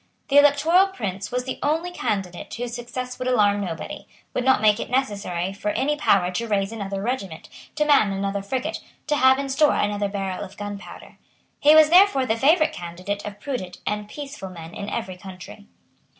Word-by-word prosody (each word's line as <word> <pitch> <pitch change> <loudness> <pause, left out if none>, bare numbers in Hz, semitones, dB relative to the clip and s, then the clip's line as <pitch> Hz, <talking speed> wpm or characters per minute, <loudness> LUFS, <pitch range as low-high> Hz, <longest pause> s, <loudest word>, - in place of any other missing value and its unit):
The 285 +1 +7
Electoral 305 +6 +5
Prince 200 - -5
was 250 0 -1
the 260 - -5
only 325 +4 0
candidate 195 - -3
whose 240 0 -5
success 250 +1 -6
would 255 - -3
alarm 205 -5 +3
nobody; 170 -4 -6 0.3
would 250 - -1
not 265 -2 +4
make 210 0 +4
it - - -5
necessary 200 -8 -1
for 205 +1 -3
any 290 +7 0
power 195 -11 +2
to 230 +6 -3
raise 200 -1 0
another 200 -3 -4
regiment, 200 -9 -4 0.3
to 300 -1 +1
man 280 -9 +4
another 195 +1 -2
frigate, 255 +6 -3 0.3
to 300 - +1
have 260 -1 +5
in 275 0 -3
store 290 +3 +3
another 205 -1 0
barrel 195 -2 -3
of 190 - -11
gunpowder. 205 -1 -8 0.4
He 300 +2 +6
was 310 0 +7
therefore 360 -7 +6
the 225 - +1
favourite 310 +6 +3
candidate 180 +4 -5
of 205 0 -8
prudent 205 -8 -5
and 210 0 -3
peaceable 280 -8 -7
men 165 -1 -10
in 200 - -5
every 190 -6 -4
country. 180 - -11
215 Hz, 185 wpm, -23 LUFS, 195-270 Hz, 0.4 s, The